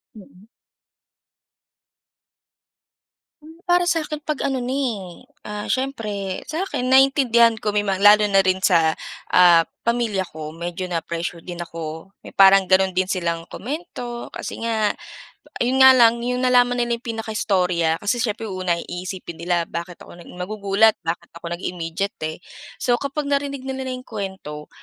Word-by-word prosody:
Mm. 200 -1 -16 2.9
Hmm, 320 +2 -15
para 350 0 +3
sa'kin 305 -2 -2
'pag 305 -1 -3
ano 265 -2 -1
na 245 - -4
eh, 235 -8 -3 0.2
ah, 210 0 -5
siyempre, 215 -8 -3
sa 320 +4 -3
akin 320 -9 -3
naintindihan 250 -4 +5
ko 210 -1 -2
may 210 - +2
mga 195 -2 -1
lalo 205 +1 +6
na 195 - +3
rin 185 0 +1
sa, 165 -4 +4 0.4
ah, 175 -2 +7 0.2
pamilya 235 -4 0
ko. 155 0 -8
Medyo 175 +2 -5
na 175 -2 -2
pressure 170 0 -5
din 175 0 -8
ako. 165 +1 -7
May - - -13
parang 195 -1 +6
gano'n 190 0 +4
din 185 +1 0
silang 170 -3 -2
komento 245 - -6
kasi - - -7
nga 220 -2 0 0.7
yun 260 +2 +1
nga 265 - +10
lang, 235 -1 +5
yung 250 +1 -1
nalaman 245 -1 +4
nila 240 -1 0
yung 235 - -25 0.2
pinakaistorya 180 -7 0
kasi 225 +4 0
siyempre, 225 -1 -2
u 185 -1 -5
una 175 -2 +1
ay - - -7
iisipin 180 -1 -7
nila, 175 -1 0
bakit 170 +1 -6
ako - - -13
nag - - -14
magugulat, 200 +3 +2
bakit 170 +1 -3
ako 170 0 -8
nag-immediate 175 +2 -4 0.2
eh. 155 - -7 0.4
So, 245 - +2
kapag 280 +1 -3
narinig 280 -1 -1
nila 265 0 -4
na 255 - -3
yung 255 0 -10
kuwento 190 -8 -7
205 Hz, 160 wpm, -22 LUFS, 175-245 Hz, 2.9 s, nga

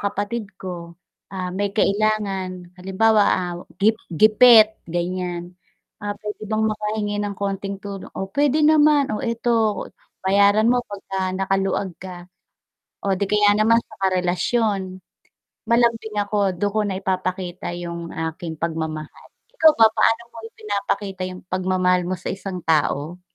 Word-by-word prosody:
kapatid 205 +2 -3
ko, 170 -2 -7 0.4
ah, 185 -1 -3
may 200 +2 -1
kailangan 195 -4 0
halimbawa, 205 +4 +3
ah, 180 -1 -3 0.3
gip 220 +2 +4 0.2
gipit 215 +4 +7 0.2
ganiyan, 175 0 -3 0.5
ah, 205 0 -4
pwede 210 0 -6
bang 220 0 0
makahingi 210 -1 -2
ng 205 -1 -3
konting 195 0 -3
tulong, 200 -1 -7
oh, 190 - -3
pwede 290 +1 +2
naman, 300 -3 +4
oh, 210 - -2
'eto 230 -3 0 0.4
bayaran 200 +3 +4
mo 250 - +2
pagka 195 -2 -4
nakaluwag 195 0 -1
ka. 180 -2 -8 0.8
Oh, 200 - +1
'di 190 +1 -1
kaya 210 0 +4
naman 215 +2 +4
sa - - -16
karelasyon, 185 +2 0 0.7
malambing 230 -2 +1
ako 205 -1 +1
dun 185 +3 -1
ko 210 +2 -1
na 195 -2 -2
ipapakita 185 -2 -3
yung 170 -1 -6
aking 160 -1 -5
pagmamahal. 160 -2 -5 0.3
Ikaw 320 -10 +7
ba 225 - +9
paano 230 +1 +3
mo - - -10
ipinapakita 200 -2 -3
yung 185 - -9
pagmamahal 185 -1 +1
mo 180 0 -3
sa - - -7
isang 190 -1 -4
tao? 160 +2 0
195 Hz, 135 wpm, -22 LUFS, 180-215 Hz, 0.8 s, ba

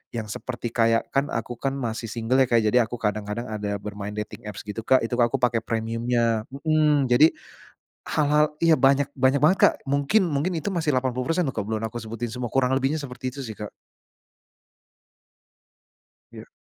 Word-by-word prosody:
yang 110 -2 -4
seperti 120 -1 -5
kayak 115 -1 +1
kan 140 +1 +1
aku 115 -2 -4
kan 135 0 -1
masih 115 -3 -4
single 115 +4 0
ya 130 - +4
Kak. 115 -2 +3
Jadi 110 +4 +3
aku 120 +1 0
kadang-kadang 105 0 -3
ada 105 -1 -3
bermain 105 0 -6
dating 105 0 -6
apps 105 - -7
gitu 105 +2 -6
Kak, 130 -2 +4
itu 115 - -3
ka 120 - +5
aku - - -3
pakai 120 -2 +2
premiumnya. 115 0 -1
Mhm. 150 -2 +2
Jadi 150 +7 +5 0.7
hal-hal 150 0 +3 0.2
ya 165 - +6
banyak 140 0 +3
banyak 130 +1 +2
banget 185 +5 +5
Kak. - - +6
Mungkin 140 +9 +2
mungkin 165 +3 -1
itu 175 +6 -3
masih 155 -6 0
80% 130 +7 0
loh 135 - -2
ke - - -3
belum 110 +2 -3
aku 120 +2 -4
sebutin 115 +1 -5
semua, 125 -1 -4
kurang 130 +1 +1
lebihnya 135 +3 +1
seperti 130 -3 -5
itu 135 - -5
sih 110 - -6
Kak. 105 -1 -5 2.6
Ya. - - -11
125 Hz, 180 wpm, -24 LUFS, 115-140 Hz, 2.6 s, ya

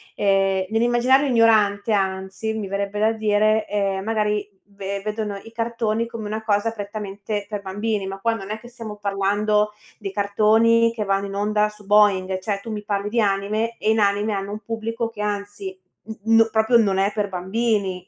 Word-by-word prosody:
ehm, 195 -1 +2
nell'immaginario 240 +5 +3
ignorante 220 -4 +3
anzi, 190 +2 -1
mi 215 -3 -4
verrebbe 200 +1 -2
da 220 +1 +4
dire, 215 0 +2
ehm, 195 -2 -1
magari 210 -2 0 0.2
ve 200 0 -5
vedono 215 -1 -3
i 225 - -12
cartoni 230 -1 -1
come 230 -2 -7
una 215 +1 -4
cosa 210 +1 +1
prettamente 205 -1 -5
per 205 -1 -4
bambini, 200 +1 -2
ma 195 0 -6
qua 230 +3 +1
non 195 -3 -6
è 215 - -3
che 240 - -13
stiamo 230 -3 -8
parlando 205 +1 +1 0.3
dei 200 -3 -5
cartoni 220 +3 +3
che 225 -2 -3
vanno 195 0 0
in 195 - -6
onda 210 +1 +1
su 210 -1 -14
Boing, 195 -2 +3
cioè 195 +1 -2
tu 225 - -7
mi 210 -1 -4
parli 205 0 -2
di 230 +2 +1
anime 210 +3 0
e 215 - +1
in 220 - +2
anime 205 +1 +2
hanno 195 0 -3
un 210 - -5
pubblico 230 +1 -3
che 220 -2 -8
anzi 205 -2 -4 0.5
n 225 0 +4
n 225 0 +5
proprio 220 +2 +4
non 200 -4 +2
è 195 +1 +2
per 205 -2 -1
bambini 190 -1 -1
210 Hz, 185 wpm, -22 LUFS, 200-220 Hz, 0.5 s, n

